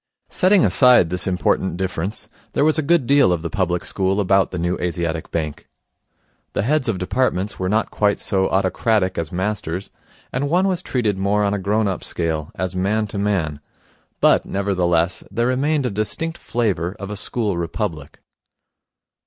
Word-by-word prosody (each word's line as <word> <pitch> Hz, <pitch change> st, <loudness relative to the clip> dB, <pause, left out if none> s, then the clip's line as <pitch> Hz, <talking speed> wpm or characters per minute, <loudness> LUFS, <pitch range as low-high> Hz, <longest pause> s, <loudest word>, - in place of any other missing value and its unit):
Setting 190 Hz, -1 st, +4 dB
aside 125 Hz, -10 st, +5 dB
this 90 Hz, 0 st, -1 dB
important 90 Hz, -1 st, 0 dB
difference, 95 Hz, +3 st, -3 dB, 0.3 s
there 145 Hz, -, +2 dB
was 155 Hz, 0 st, +3 dB
a -, -, +3 dB
good 160 Hz, -2 st, +2 dB
deal 140 Hz, -7 st, +4 dB
of 85 Hz, -2 st, -1 dB
the 85 Hz, -, -4 dB
public 90 Hz, -4 st, -1 dB
school 95 Hz, +1 st, 0 dB
about 95 Hz, -1 st, +3 dB
the 90 Hz, -, -5 dB
New 85 Hz, +1 st, 0 dB
Asiatic 85 Hz, -2 st, -2 dB
Bank. 75 Hz, -3 st, -4 dB, 0.9 s
The -, -, 0 dB
heads 135 Hz, +1 st, +1 dB
of 105 Hz, -, 0 dB
departments 95 Hz, +1 st, -1 dB
were 95 Hz, 0 st, -1 dB
not 110 Hz, +2 st, 0 dB
quite 105 Hz, -1 st, +1 dB
so 95 Hz, -1 st, 0 dB
autocratic 95 Hz, 0 st, +1 dB
as 80 Hz, -2 st, -4 dB
masters, 95 Hz, -1 st, -3 dB, 0.4 s
and 140 Hz, +3 st, -1 dB
one 180 Hz, +4 st, +3 dB
was 185 Hz, -2 st, 0 dB
treated 110 Hz, -, -1 dB
more 100 Hz, +2 st, +1 dB
on 100 Hz, 0 st, +1 dB
a 100 Hz, -, -1 dB
grown 105 Hz, +3 st, +1 dB
up 95 Hz, -, -3 dB
scale, 80 Hz, -3 st, -2 dB
as 95 Hz, +1 st, -3 dB
man 105 Hz, +4 st, +1 dB
to 100 Hz, -, -4 dB
man; 90 Hz, -8 st, -1 dB, 0.6 s
but, -, -, +5 dB
nevertheless, 90 Hz, -3 st, 0 dB
there 115 Hz, +4 st, -1 dB
remained 140 Hz, +3 st, +1 dB
a 125 Hz, -, -1 dB
distinct 160 Hz, +11 st, -2 dB
flavour 100 Hz, -6 st, -1 dB
of 100 Hz, +1 st, -6 dB
a -, -, -4 dB
school 105 Hz, -1 st, -1 dB
republic. 85 Hz, -3 st, -4 dB
100 Hz, 170 wpm, -21 LUFS, 90-115 Hz, 0.9 s, aside